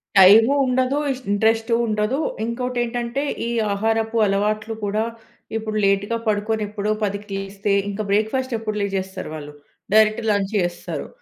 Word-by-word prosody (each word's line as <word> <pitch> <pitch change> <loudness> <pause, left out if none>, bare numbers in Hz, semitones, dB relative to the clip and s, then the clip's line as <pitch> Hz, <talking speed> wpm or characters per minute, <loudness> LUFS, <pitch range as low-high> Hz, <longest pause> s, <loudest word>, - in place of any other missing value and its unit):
Time 210 +7 +8
ఉండదు. 255 +2 +1 0.3
Interest 225 +3 +2
ఉండదు. 215 +4 0 0.3
ఇంకోటి 250 +1 -2
ఏంటంటే, 240 +3 -2 0.2
ఈ - - -2 0.2
ఆహారపు 225 +2 0
అలవాట్లు 210 +3 0
కూడా 210 +2 0 0.5
ఇప్పుడు 215 -1 -3
లేట్‌గా 200 +3 +1
పడుకొని 215 +1 0
ఎప్పుడో 210 0 -2
10కి 205 +1 -3
లేస్తే, 195 +1 -2 0.2
ఇంక 200 +1 -3
బ్రేక్‌ఫాస్ట్ 230 +5 0
ఎప్పుడు 215 -1 -3
లేచేస్తారు 190 -2 -3
వాళ్ళు. 150 -1 -8 0.4
డైరెక్ట్ 215 +1 +4
లంచ్ 200 -1 0
చేస్తారు. 175 -1 -3
215 Hz, 130 wpm, -22 LUFS, 200-225 Hz, 0.5 s, Time